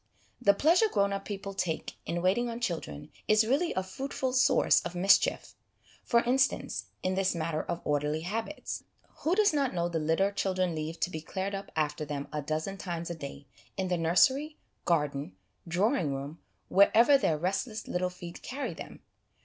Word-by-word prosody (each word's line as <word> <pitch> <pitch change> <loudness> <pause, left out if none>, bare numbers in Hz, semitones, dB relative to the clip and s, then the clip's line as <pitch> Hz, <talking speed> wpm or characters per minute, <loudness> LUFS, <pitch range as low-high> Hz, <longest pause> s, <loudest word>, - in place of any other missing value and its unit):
The 200 -4 +5
pleasure 340 - +4
grown 200 0 +2
up 195 0 -4
people 200 -1 -5
take 170 -4 -2
in 175 +1 -2
waiting 235 +7 +2
on 230 0 -5
children 160 - -4 0.2
is 215 +1 +5
really 285 +9 +1
a 190 - 0
fruitful 260 +6 -3
source 255 - +4
of 175 - -6
mischief; 190 +3 +3 0.5
for 235 -1 +3
instance, 260 +2 +1 0.2
in 185 - +1
this 190 -1 +1
matter 160 -1 -1
of 170 - -4
orderly 150 +1 0
habits. 225 - -4 0.3
Who 335 +4 +1
does 415 -4 +4
not 275 -8 0
know 170 0 +1
the 165 -1 -1
litter 165 +6 +2
the 200 - -15
children 185 -3 0
leave 160 +1 -4
to 180 - 0
be 160 - -5
cleared 190 +5 -4
up 195 0 -6
after 155 -1 -1
them 145 -1 -5
a 150 - -1
dozen 155 +7 -3
times 170 -2 -4
a - - -4
day, 140 -2 -8 0.3
in 190 -1 -1
the 180 - +2
nursery, 265 - +3 0.3
garden, 145 - 0 0.3
drawing 175 - +1
room, 140 +4 -6 0.3
wherever 225 +8 +6
their 165 - +2
restless 195 +7 -2
little 180 0 -1
feet 175 -1 -10
carry 275 +2 -4
them? - - -10
185 Hz, 180 wpm, -30 LUFS, 160-225 Hz, 0.5 s, wherever